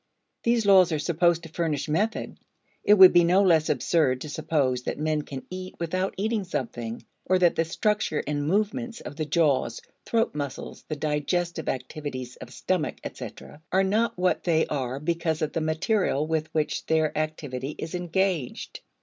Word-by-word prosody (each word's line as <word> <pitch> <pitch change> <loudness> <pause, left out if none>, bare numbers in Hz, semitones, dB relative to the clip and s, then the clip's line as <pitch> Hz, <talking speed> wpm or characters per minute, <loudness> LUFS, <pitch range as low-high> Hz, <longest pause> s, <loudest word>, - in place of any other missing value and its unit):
These 235 -2 +2
laws 190 -3 +6
are 155 - +1
supposed 170 +2 +1
to 165 - -9
furnish 155 -4 -2
method. 205 +9 -1 0.4
It 210 - +6
would 190 -2 +9
be 175 0 +6
no 180 +4 +4
less 165 -5 +4
absurd 140 -7 +2
to 155 - -6
suppose 135 -4 0
that - - -4
men 155 0 0
can 135 -2 -8
eat 185 0 -6
without 185 +3 -1
eating 215 +1 0
something, 120 -9 -5 0.2
or 185 - +4
that 175 -2 +3
the 165 - +2
structure 210 -1 0
and 145 0 -2
movements 230 +6 -1
of - - -8
the 155 -1 -3
jaws, 145 -7 +1 0.3
throat 230 0 +1
muscles, 140 -2 -6
the 155 - -3
digestive 160 +3 -1
activities 130 -1 -5
of 120 - -10
stomach, 175 +2 -1
etc., 150 - -9
are 190 +1 +3
not 215 +4 +1
what 180 0 +1
they 160 -2 +2
are 130 -2 -3
because 160 0 -1
of 150 - -2
the 165 - -1
material 155 -1 +1
with 160 0 -2
which 155 -1 -1
their 160 -1 +1
activity 150 -3 -3
is 160 +2 -6
engaged. 180 -4 -2
160 Hz, 170 wpm, -26 LUFS, 150-185 Hz, 0.4 s, would